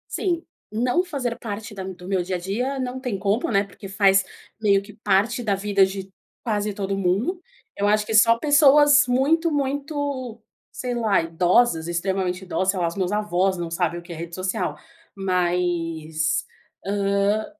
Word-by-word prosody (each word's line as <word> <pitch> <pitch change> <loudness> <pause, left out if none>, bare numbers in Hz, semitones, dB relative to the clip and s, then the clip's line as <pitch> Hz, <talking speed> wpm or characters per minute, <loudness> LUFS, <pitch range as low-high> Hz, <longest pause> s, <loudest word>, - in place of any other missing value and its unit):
Sim, 345 -3 -1 0.3
não 245 +9 +1
fazer 270 -9 -4
parte 220 0 -6
da 195 - -6
do 180 -1 -8
meu 190 -1 0
dia-a-dia 195 +10 -2
não 255 0 -4
tem 250 -7 -3
como, 205 +5 0
né, 200 -2 +2
porque 195 +1 -11
faz 195 -1 +4 0.4
meio 200 -2 +3
que 205 +1 -13
parte 210 +3 +1
da 210 -4 +1
vida 195 0 +3
de 190 0 -7 0.3
quase 210 -3 -1
todo 195 -1 -2
mundo. 200 - 0 0.3
Eu 205 +1 0
acho 210 0 +3
que 220 - -4
só 230 +2 +6
pessoas 290 0 +6
muito, 305 +7 +2
muito, 280 -3 -2 0.3
sei 250 -1 -4
lá, 220 -6 +2
idosas, 170 +2 +2
extremamente 185 +1 -2
idosa, 190 +1 0
sei 190 - -4
lá, 170 - +2
as 165 - -3
meus 185 -2 -1
avós 195 -2 +1
não 170 -1 -4
sabem 170 0 -1
o - - -17
que 170 0 -10
é - - -6
rede 170 +1 -7
social, 185 +1 -2 0.4
mas, 175 -4 -1 0.4
hã, 200 +1 +1
200 Hz, 165 wpm, -23 LUFS, 185-245 Hz, 0.4 s, só